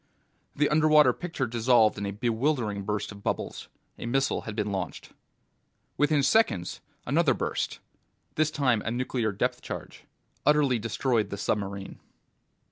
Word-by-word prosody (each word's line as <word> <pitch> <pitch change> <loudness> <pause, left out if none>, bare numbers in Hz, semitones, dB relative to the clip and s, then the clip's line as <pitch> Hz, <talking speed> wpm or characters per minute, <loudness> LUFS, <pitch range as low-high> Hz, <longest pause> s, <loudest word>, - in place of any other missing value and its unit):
The 150 +1 +3
underwater 150 -3 +5
picture 165 -5 -3
dissolved 115 -1 +3
in 100 0 -4
a - - -2
bewildering 115 0 -1
burst 105 +1 -3
of 100 0 -11
bubbles. - - -3 0.3
A - - -5
missile 135 +3 +1
had 105 - -5
been 105 -2 -1
launched. 95 -2 -5 0.8
Within 145 0 +2
seconds, 125 - +2 0.2
another - - +3
burst - - -2 0.6
this 155 0 +2
time 130 -7 +1
a - - -2
nuclear 120 -2 -1
depth 95 - -1
charge - - -8 0.4
utterly 145 -5 +3
destroyed 115 -1 0
the 100 - -5
submarine. 100 -1 -3
120 Hz, 135 wpm, -27 LUFS, 105-140 Hz, 0.8 s, underwater